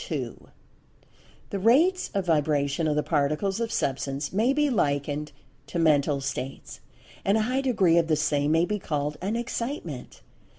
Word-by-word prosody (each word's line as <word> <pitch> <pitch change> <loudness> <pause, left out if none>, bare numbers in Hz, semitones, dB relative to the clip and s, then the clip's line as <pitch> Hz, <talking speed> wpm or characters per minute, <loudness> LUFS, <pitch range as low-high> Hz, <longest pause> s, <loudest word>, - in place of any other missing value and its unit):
—The 200 - -2
rates 310 - +3
of 195 -2 0
vibration 150 -1 +1
of 150 - +1
the 150 - +1
Particles 155 +8 0
of 230 -1 -2
Substance 135 +2 -2
may 225 +6 +3
be 295 +1 +2
likened 145 - -1 0.4
to - - -4
"Mental 150 -3 +3
States"; 135 -1 -5 0.4
and 200 +2 +3
a 220 - +2
high 255 +4 0
degree 195 -11 +3
of 165 - 0
the 155 - +3
same 150 -1 +1
may 165 +2 +3
be 210 +2 -2
called 150 -3 -2
an 200 +5 -1
"Excitement." 235 - -5
165 Hz, 155 wpm, -26 LUFS, 145-220 Hz, 0.4 s, rates